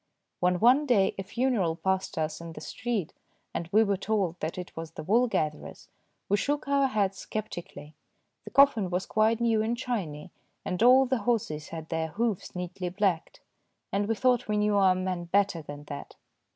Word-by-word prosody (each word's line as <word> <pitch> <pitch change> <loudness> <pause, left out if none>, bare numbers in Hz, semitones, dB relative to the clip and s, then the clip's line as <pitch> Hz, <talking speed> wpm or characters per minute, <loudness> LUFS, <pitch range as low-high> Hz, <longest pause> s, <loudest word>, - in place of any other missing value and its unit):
When 180 0 +2
one 260 +6 +5
day 205 -7 +3
a - - -2
funeral 205 -5 0
passed 190 +2 -1
us 155 0 -2
in 165 -1 -8
the - - -8
street, 225 -9 -3 0.4
and 165 0 -4
we 215 +2 +5
were 200 -2 0
told 190 -4 -1
that 160 +3 -4
it 180 -1 -7
was 165 0 -7
the - - -7
wool 230 +9 +3
gatherer's, 155 -9 -3 0.4
we 205 - +2
shook 290 +7 -1
our 280 -1 +3
heads 200 -6 -1
sceptically. 175 -8 -6 0.5
The - - -9
coffin 275 -9 +4
was 180 +1 -1
quite 220 +1 +2
new 230 -2 +2
and 230 +2 -1
shiny, 185 -11 -4 0.3
and 180 - -2
all 255 +3 +7
the 260 -1 0
horses 205 -9 -1
had 160 -1 -8
their 160 0 -1
hoofs 210 +3 -2
neatly 180 0 -4
blacked, 185 -3 -1 0.5
and 200 +1 0
we 225 - +1
thought 250 +1 +2
we 210 -1 0
knew 210 0 +2
our 190 -2 +5
man 185 -1 -2
better 195 -1 +1
than 145 -1 -9
that. 145 -1 -8
195 Hz, 185 wpm, -28 LUFS, 170-230 Hz, 0.5 s, all